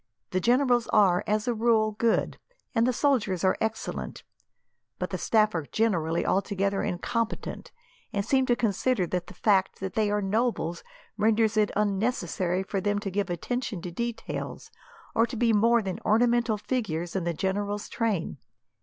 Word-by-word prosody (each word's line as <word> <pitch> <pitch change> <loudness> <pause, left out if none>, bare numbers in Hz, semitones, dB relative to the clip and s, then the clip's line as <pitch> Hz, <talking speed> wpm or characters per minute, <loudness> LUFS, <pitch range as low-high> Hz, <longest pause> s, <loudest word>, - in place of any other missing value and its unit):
The 185 - +1
generals 245 +2 +3
are, 195 -5 +4
as 210 +1 0
a 240 - +2
rule, 220 -1 +2
good, 220 +2 0 0.3
and 230 -1 +3
the - - +3
soldiers 235 - +1
are 190 - +3
excellent, 220 0 -3 0.7
but - - -4
the - - -2
staff 215 -1 +3
are 160 -4 -3
generally 170 -7 0
altogether 195 0 0
incompetent, 230 +6 -3 0.4
and 200 0 -1
seem 265 -1 +2
to 240 - +3
consider 225 -1 +1
that 180 0 -3
the 180 - -12
fact 195 -1 +2
that 190 -1 -4
they 215 -2 +1
are 210 0 +1
nobles 200 -4 -1 0.3
renders 220 0 +2
it 215 -1 +3
unnecessary 195 -3 0
for 195 0 -3
them 205 +1 0
to 205 -1 -3
give 200 0 -1
attention 220 +4 -3
to 180 - -5
details, 235 +4 -5 0.4
or 230 +1 +3
to 235 - -6
be 230 0 +3
more 230 +2 +4
than 190 -2 -4
ornamental 235 0 +3
figures 175 -8 -3
in 190 - 0
the 170 0 -1
general's 205 +3 -2
train. 210 -10 -2
210 Hz, 165 wpm, -27 LUFS, 190-230 Hz, 0.7 s, are